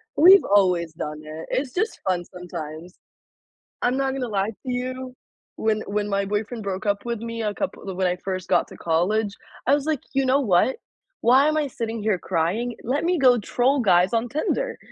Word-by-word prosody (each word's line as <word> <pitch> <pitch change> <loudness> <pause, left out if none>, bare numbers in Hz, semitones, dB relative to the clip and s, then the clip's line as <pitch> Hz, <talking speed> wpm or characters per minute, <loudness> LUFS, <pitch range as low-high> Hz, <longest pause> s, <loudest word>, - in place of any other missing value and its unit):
We've 375 +5 +8
always 180 -5 +3
done 150 -1 -5
it, 155 +1 -8
it's 260 -1 -1
just 435 +5 -1
fun 180 -2 +1
sometimes. 175 -2 -8 0.9
I'm 250 +2 +1
not 270 -1 0
gonna 265 -2 -3
lie 200 -1 0
to 225 - -9 0.2
you. 255 +1 -4 0.4
When 215 -1 +1
when 205 0 -1
my 200 0 0
boyfriend 215 +3 -3
broke 195 +1 -4
up 200 0 0
with 235 -2 -2
me 230 0 -5
a 210 -1 -1
couple 200 -8 -4
when 185 0 +1
I 180 - 0
first 185 0 -4
got 175 - +3
to - - -12
college, 200 +6 0 0.3
I 275 - +5
was 285 0 +1
like, 310 -4 0
"You 270 0 +2
know 260 +2 +3
what? 210 +2 +2 0.4
Why 260 +5 +5
am 310 0 +1
I 300 -2 +1
sitting 230 -3 -4
here 205 -3 +1
crying? 190 +9 -1
Let 265 +5 -1
me 355 0 +2
go 255 -3 +6
troll 250 +6 +1
guys 185 -2 +4
on 230 +1 0
Tinder." 470 - -1
220 Hz, 195 wpm, -24 LUFS, 185-260 Hz, 0.9 s, We've